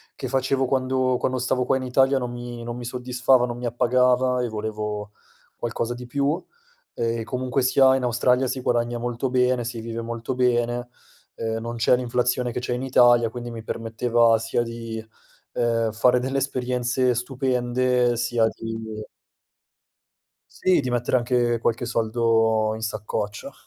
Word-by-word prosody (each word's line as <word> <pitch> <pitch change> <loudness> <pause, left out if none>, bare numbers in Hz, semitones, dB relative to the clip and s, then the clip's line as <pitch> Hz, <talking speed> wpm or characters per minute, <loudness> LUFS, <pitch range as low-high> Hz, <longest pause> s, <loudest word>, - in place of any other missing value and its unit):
che 130 - -5
facevo 135 0 +1
quando 130 -1 +1
quando 130 0 -1
stavo 125 0 0
qua 130 - +2
in 130 - -2
Italia 135 +2 +3
non 125 -1 -3
mi 120 -1 -7
non 120 +1 -5
mi 120 - -7
soddisfava, 125 +1 +2
non 120 -1 -5
mi 125 - -6
appagava 125 +1 +2
e 125 - -1
volevo 105 -1 -4 0.5
qualcosa 120 0 -2
di 125 0 -8
più; 140 +6 0 0.5
ehm, 115 0 -1
e 115 - -3
comunque 125 +2 -1
sia 130 +1 +5
in 130 - -3
Australia 125 +2 +2
si 130 +1 -3
guadagna 120 0 0
molto 120 +2 -2
bene, 125 -1 +2
si 115 -1 -5
vive 115 0 -5
molto 115 +2 -4
bene, 120 -1 +1 0.5
ehm, 115 0 -3
non 115 +1 -5
c'è 120 +2 +3
l'inflazione 125 0 0
che 125 - -3
c'è 125 - -2
in 125 +2 -3
Italia, 120 -3 +5
quindi 120 +1 -7
mi 115 -1 -7
permetteva 115 0 +2
sia 115 +1 -1
di, 115 -1 -6 0.5
ehm, 115 -1 +1
fare 125 +3 +3
delle 135 +2 -2
esperienze 125 -1 0
stupende 125 -1 +1
sia 120 -1 +1
di 115 0 -5 1.7
Sì, 185 -4 +2
di 125 -2 -3
mettere 120 +1 +1
anche 120 -1 +1
qualche 120 +1 -1
soldo 115 -1 +2
in - - -8
saccoccia. 105 -1 -4
120 Hz, 160 wpm, -24 LUFS, 115-125 Hz, 1.7 s, sia